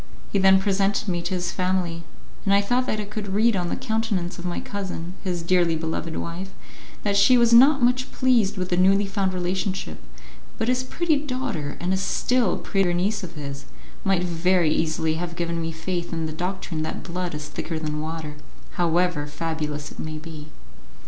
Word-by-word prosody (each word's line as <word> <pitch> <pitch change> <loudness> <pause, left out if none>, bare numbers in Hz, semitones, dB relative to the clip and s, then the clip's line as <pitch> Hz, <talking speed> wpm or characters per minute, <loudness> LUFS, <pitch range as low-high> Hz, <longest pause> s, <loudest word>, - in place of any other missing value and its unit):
He 200 - +2
then 190 0 +6
presented 195 +1 +1
me 175 -2 0
to 185 - -2
his 175 -1 -2
family, 180 -2 -1 0.4
and 200 -1 +3
I 200 - +5
thought 245 +5 +1
that 215 - 0
I - - -1
could 205 -2 -4
read 225 +1 +4
on 175 -2 -1
the - - -1
countenance 220 -7 -2
of 175 - -7
my 175 - -2
cousin, 185 -3 -5
his 175 -3 -2
dearly 175 -1 +3
beloved 160 0 -3
wife, 175 +3 -4 0.5
that 200 -1 +1
she 200 +6 +6
was 235 -1 +4
not 270 +3 +7
much 250 +1 +2
pleased 230 -6 +2
with 185 -1 -2
the 175 - +1
newly 195 +2 +4
found 195 -1 0
relationship, 185 +1 -2 0.6
but 225 - 0
his 250 0 +2
pretty 320 +3 +1
daughter, 255 - -3
and 180 +2 0
a - - +2
still 235 +2 +1
prettier 190 -3 +1
niece 200 +4 0
of 170 -2 -7
his, 140 -2 -6 0.4
might 190 -2 +2
very 175 -1 +2
easily 160 0 0
have 170 -1 -4
given 170 -1 -2
me 165 0 -2
faith 170 +2 -3
in 165 -1 -2
the 155 - -3
doctrine 180 0 -3
that 155 - -4
blood 180 -2 -3
is 150 -1 -5
thicker 160 +2 -4
than 150 -1 -3
water, 155 -1 -5 0.4
however 175 -3 +2
fabulous 150 -2 -3
it - - -13
may 155 0 -4
be. 155 -1 -9
180 Hz, 190 wpm, -24 LUFS, 165-200 Hz, 0.6 s, not